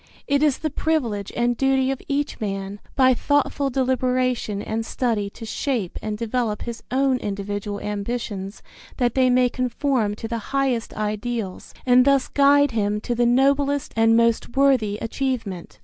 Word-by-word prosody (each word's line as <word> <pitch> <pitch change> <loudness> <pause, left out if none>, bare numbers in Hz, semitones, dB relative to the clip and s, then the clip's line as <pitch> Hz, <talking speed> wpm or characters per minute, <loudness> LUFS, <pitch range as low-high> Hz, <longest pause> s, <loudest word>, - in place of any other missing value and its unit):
It 285 0 +2
is 300 -3 +3
the 310 - -3
privilege 245 -11 -1
and 240 0 +1
duty 270 +1 +2
of 270 - -4
each 285 +1 -2
man, 195 -1 -4 0.2
by 260 -2 +5
thoughtful 285 +1 +1
deliberation 255 -4 0
and 220 +2 -3
study 225 -3 -1
to 225 +3 -10
shape 225 -4 -2
and 215 -1 -3
develop 230 -1 -2
his 235 -1 -6
own 265 +1 +2
individual 205 -1 -4
ambitions 205 -1 -4 0.3
that 245 -3 +1
they 260 -1 +3
may 250 0 +4
conform 250 -3 -1
to 225 - -6
the 230 0 -3 0.2
highest 255 -4 0
ideals 215 -1 -3
and 250 0 +6
thus 275 -1 +2
guide 285 0 +4
him 210 -2 0
to 240 - -2
the 240 0 +2
noblest 275 +3 +2
and 225 0 +4
most 235 +2 +1
worthy 255 -7 +3
achievement. 225 -7 -3
240 Hz, 155 wpm, -23 LUFS, 215-270 Hz, 0.3 s, and